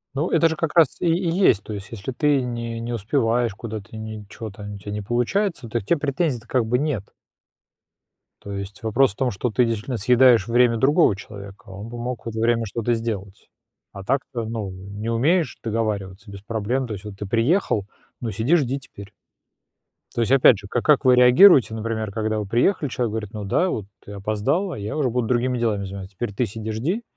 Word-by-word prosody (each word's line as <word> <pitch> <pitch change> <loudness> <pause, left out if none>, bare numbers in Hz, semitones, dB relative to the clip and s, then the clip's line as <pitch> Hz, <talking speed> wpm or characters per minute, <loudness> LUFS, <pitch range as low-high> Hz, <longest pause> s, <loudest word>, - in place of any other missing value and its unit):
Ну, 155 +6 0
это 165 0 +4
же 160 - -2
как 160 -1 -2
раз 165 -6 +4
и - - 0
и 170 +1 +1
есть, 170 - +3
то 110 - -7
есть 100 -1 -7
если 115 +3 -5
ты 145 +1 +2
не 120 -2 -4
не 120 +1 -4
успеваешь 115 0 0
куда-то, 110 0 -8
ничего 110 0 -7
там, 105 +1 -9
у - - -8
тебя 100 +1 -7
не 105 0 -3
получается, 120 - -1
то 120 - -1
к 100 - -11
тебе 170 - +1
претензий-то 140 -5 -1
как 125 -2 +1
бы 125 +3 +1
нет. 140 -10 -3 1.3
То 100 - -7
есть 100 -1 -7
вопрос 110 0 +2
в - - -30
том, 130 -2 0
что 110 +5 -2
ты 120 +4 +3
действительно 115 +2 -2
съедаешь 120 0 +5
время 120 0 +3
другого 140 - +4
человека, 100 -2 -11
он 100 +4 -8
бы 120 - -7
мог 120 0 -5
в 115 - -3
это 110 0 -5
время 115 0 +2
что-то 115 +3 -1
сделать, 105 -4 -5 0.4
а 100 -1 -9
так-то, 120 0 -2
ну, 110 -4 -4
не 100 +4 -7
умеешь 155 +9 +1
договариваться 105 -3 -3
без 100 -1 -9
проблем, 115 +4 -2
то 110 - -5
есть 95 - -8
вот 105 -2 -9
ты 105 - -5
приехал, 115 - +1 0.4
ну 115 -2 -3
сиди, 115 - +2
жди 135 -3 0
теперь. 100 -6 -13 1.0
То 120 - 0
есть 115 - 0
опять 130 -5 +6
же, 100 0 -10
ка 120 +3 -1
как 150 -2 +3
вы 125 -1 +7
реагируете, 125 - +7
например, 110 -2 -3
когда 110 0 -1
вы 105 - -3
приехали, 135 - +1
человек 120 -3 -2
говорит: 110 -2 -5
"Ну 105 -2 -5
да, 180 - +1
вот 105 - -3 0.2
ты 100 - -10
опоздала, 110 - -1
я 105 +8 -5
уже 140 -5 +1
буду 120 -1 -1
другими 125 0 +1
делами 105 -4 0
заниматься. 95 0 -8
Теперь 105 0 -4
ты 120 +4 0
сиди 110 +2 -6
жди, 165 - -2
115 Hz, 210 wpm, -23 LUFS, 105-130 Hz, 1.3 s, вы